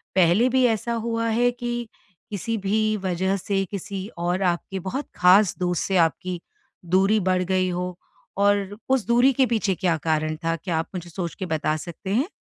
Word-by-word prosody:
पहले 190 +7 +4
भी 260 0 +3
ऐसा 230 0 0
हुआ 230 0 -1
है 240 +2 +3
कि 240 -1 -4 0.4
किसी 220 +3 -2
भी 215 +2 +1
वजह 190 +1 0
से 195 +1 -1
किसी 200 0 -5
और 175 +2 -1
आपके 180 +2 -1
बहुत 255 +11 -4
ख़ास 185 +2 +5
दोस्त 180 -2 0
से 190 -1 +1
आपकी 175 +2 +1 0.5
दूरी 195 +5 +3
बढ़ 185 -1 +1
गई 185 0 +1
हो, 180 0 -3 0.4
और 205 0 +2
उस 265 -4 +2
दूरी 245 +3 +4
के 265 +1 +3
पीछे 220 -5 0
क्या 170 -2 +1
कारण 155 -1 0
था, 165 0 +1
क्या 165 0 -3
आप 165 - -3
मुझे 175 -1 -6
सोच 170 0 -5
के 185 - -4
बता 155 -2 0
सकते 170 +4 -8
हैं? 265 - +2
190 Hz, 185 wpm, -24 LUFS, 175-220 Hz, 0.5 s, ख़ास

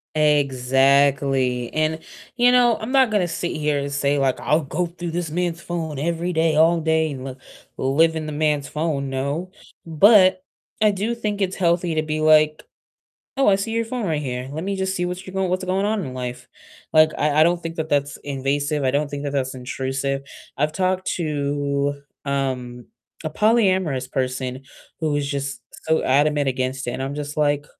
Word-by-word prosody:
Exactly, 135 -3 +2
and, 155 +1 0 0.4
you 245 0 +5
know, 245 -2 +4
I'm 220 +3 -5
not 265 -4 +4
gonna 200 -4 +2
sit 175 0 -3
here 150 -1 0
and 140 0 -3
say 140 0 +1
like, 135 -2 +1
"I'll 155 +2 +2
go 175 +6 -2
through 170 0 -6
this 170 -1 -3
man's 170 +1 -2
phone 160 -5 -4
every 170 +3 -1
day, 160 -1 +2
all 165 +2 +4
day, 160 0 +1
and 130 -2 -7
li 130 -1 -6 0.4
live 160 +5 +2
in 160 -1 -3
the 155 - -5
man's 150 -1 0
phone," 150 -3 -2
no, 140 +7 -3 0.3
but 185 +3 +5 0.4
I 215 - +6
do 205 +4 -2
think 210 -3 -3
it's 190 -1 0
healthy 175 -1 +1
to 155 - +1
be 155 0 -3
like, 155 0 +4 0.7
"Oh, 270 -3 +3
I 195 - +5
see 215 +3 -3
your 230 0 0
phone 230 -2 -3
right 155 -3 -1
here, 125 -1 -4
let 155 +4 -5
me 200 0 -2
just 190 0 -1
see 180 - -1
what 180 +1 -5
you 185 - -8
going 190 -1 -1
what 185 - +1
is - - -6
going 190 +2 0
on 215 0 0
in 130 - -7
life." 125 0 -6 0.5
Like, 155 0 +6
I 150 0 +2
I - - +8
don't 170 +1 +2
think 165 0 -5
that 160 -1 -4
that's 145 0 0
invasive, 145 +2 -1
I 130 - +2
don't 145 +2 -1
think 145 0 -5
that 140 - -3
that's 135 -2 -1
intrusive, 135 +2 -3 0.3
I've 150 +3 0
talked 185 +1 -1
to, 145 -2 -1 0.2
um, 130 -3 -3 0.4
a - - 0
polyamorous 185 - +2
person 130 0 -3 0.4
who 160 -1 0
was 145 -1 -1
just 140 -2 -3 0.2
so 160 0 +2
adamant 145 +1 +2
against 130 +1 -2
it, 120 - -2
and 130 - -4
I'm 135 +1 -3
just 145 0 -5
like, 145 -1 +1
150 Hz, 195 wpm, -22 LUFS, 140-175 Hz, 0.7 s, I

